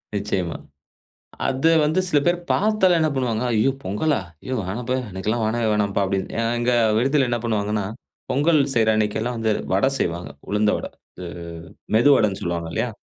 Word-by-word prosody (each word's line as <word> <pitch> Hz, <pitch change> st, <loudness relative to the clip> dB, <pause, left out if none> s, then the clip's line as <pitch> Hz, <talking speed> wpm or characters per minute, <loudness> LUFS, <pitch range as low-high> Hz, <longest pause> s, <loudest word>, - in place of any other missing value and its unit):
நிச்சயமா. 95 Hz, -4 st, -2 dB, 0.9 s
அது 135 Hz, +5 st, +2 dB
வந்து 155 Hz, +5 st, +2 dB
சில 150 Hz, -, +3 dB
பேரு 175 Hz, 0 st, +2 dB
பாத்தாலே 210 Hz, -3 st, +3 dB
என்ன 160 Hz, -, +3 dB
பண்ணுவாங்க, 120 Hz, -4 st, -1 dB
"ஐயோ! 110 Hz, +4 st, +3 dB
பொங்கலா? 105 Hz, +11 st, 0 dB, 0.3 s
ஐயோ! 130 Hz, -, -3 dB
வேணாம்ப்பா 120 Hz, +6 st, -3 dB, 0.2 s
எனக்கெல்லாம் 110 Hz, +5 st, -2 dB
வேணவே 115 Hz, +1 st, 0 dB
வேணாம்ப்பா" 100 Hz, -1 st, +1 dB
அப்டின்னுட்டு 95 Hz, +2 st, -2 dB, 0.2 s
இங்க 120 Hz, +1 st, +1 dB, 0.3 s
விடுதில 135 Hz, +2 st, +2 dB
என்ன 120 Hz, -, 0 dB
பண்ணுவாங்கன்னா, 105 Hz, -2 st, -1 dB, 0.5 s
பொங்கல் 150 Hz, +3 st, +3 dB
செய்ற 110 Hz, -2 st, +3 dB
அன்னைக்கெல்லாம் 110 Hz, +3 st, -1 dB
வந்து 110 Hz, -1 st, +1 dB, 0.2 s
வட 95 Hz, +7 st, +3 dB
செய்வாங்க 85 Hz, -2 st, -2 dB, 0.2 s
உளுந்த 105 Hz, +1 st, +2 dB
வட, -, -, -5 dB, 0.3 s
இது 90 Hz, -, -6 dB, 0.7 s
மெதுவடன்னு 110 Hz, -5 st, +4 dB
சொல்லுவாங்க 85 Hz, -1 st, -3 dB
இல்லயா? 125 Hz, -, -1 dB
110 Hz, 145 wpm, -22 LUFS, 100-135 Hz, 0.9 s, மெதுவடன்னு